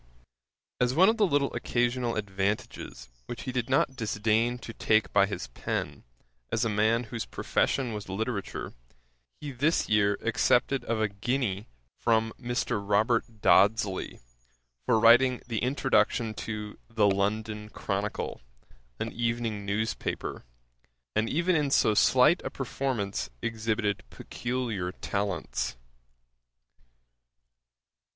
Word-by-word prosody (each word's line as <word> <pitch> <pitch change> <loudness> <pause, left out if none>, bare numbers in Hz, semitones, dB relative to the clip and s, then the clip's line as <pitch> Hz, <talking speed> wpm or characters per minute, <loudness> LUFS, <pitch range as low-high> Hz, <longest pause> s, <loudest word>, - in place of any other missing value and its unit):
As 125 +1 +2
one 185 +5 +7
of 225 - +1
the 210 -3 +4
little 140 -4 +1
occasional 120 0 0
advantages 100 -5 -3 0.2
which 120 - -6
he 130 - -3
did 125 -1 -2
not 135 0 +2
disdain 110 +1 +1
to 115 -2 -9
take 110 -1 +2
by 100 -1 +5
his 100 - -4
pen, - - -4 0.5
as 115 +1 +1
a - - +1
man 110 +3 +2
whose 115 0 -5
profession 125 -4 0
was 105 -2 -6
literature, 100 +1 -3 0.7
he 145 - -5
this 145 +6 +1
year 100 -1 +3
accepted 125 +3 +2
of 115 -1 -1
a 110 - +2
guinea 105 0 -2 0.3
from 115 -1 +2
Mr. 120 -4 -1
Robert 110 +2 +1
Dodsley, 100 -1 +3 0.7
for 115 - +4
writing 120 +3 +6
the 115 -3 -2
introduction 125 -3 +1
to 105 -1 -6
The 110 -2 +2
London 105 +2 -1
Chronicle, 100 - -3 0.6
an - - -3
evening 115 -3 -2
news 110 +3 0
paper; - - -5 0.7
and 110 +1 +1
even 170 +4 +2
in 150 -3 +1
so 110 -5 +4
slight 130 - +5
a - - -3
performance 115 - -3
exhibited 110 -2 -1
peculiar 115 - -3
talents. 100 -12 -3
115 Hz, 120 wpm, -28 LUFS, 105-125 Hz, 0.7 s, one